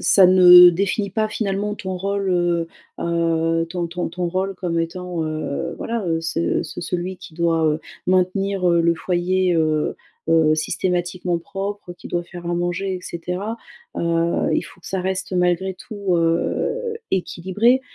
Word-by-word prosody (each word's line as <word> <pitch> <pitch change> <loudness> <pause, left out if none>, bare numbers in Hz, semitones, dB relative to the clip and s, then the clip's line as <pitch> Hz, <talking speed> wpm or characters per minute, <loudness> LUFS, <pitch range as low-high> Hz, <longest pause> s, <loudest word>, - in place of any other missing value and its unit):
ça 195 - +6
ne 180 -1 +9
définit 200 +3 -1
pas, 215 +2 0
finalement, 205 -1 -2
ton 190 -2 -5
rôle. 195 +1 -1 0.7
Heu, 165 -1 +1
ton 175 0 -2
ton 175 +1 -3
ton 175 +1 -3
rôle 190 +2 -2
comme 175 -2 -2
étant, 175 0 -3
heu, 155 +1 -3
voilà, 230 -5 -3
heu 165 -1 0
ce 165 0 0
ce - - -7
celui 180 +2 -3
qui 180 -4 -12
doit, 165 -1 +1
heu, 155 +1 +1 0.3
maintenir, 185 +1 +1
heu, 170 0 +4
le 170 0 +3
foyer, 180 +1 0
heu 155 -1 +1 0.3
heu, 160 -1 +4
systématiquement 175 +2 -1
propre, 195 +2 -5
qui - - -12
doit 175 - -2
faire 175 0 -10
à 175 - 0
manger 175 +2 -1
et 180 - -5
cetera. 180 +7 -4 0.4
Heu, - - -2 0.5
il - - +1
faut 180 - -14
que - - -14
ça 190 - -2
reste 185 0 -3
malgré 180 +1 +1
tout, 200 -2 -3
heu, 450 - 0 0.2
équilibré. 190 +7 +1
180 Hz, 160 wpm, -21 LUFS, 170-190 Hz, 0.7 s, ne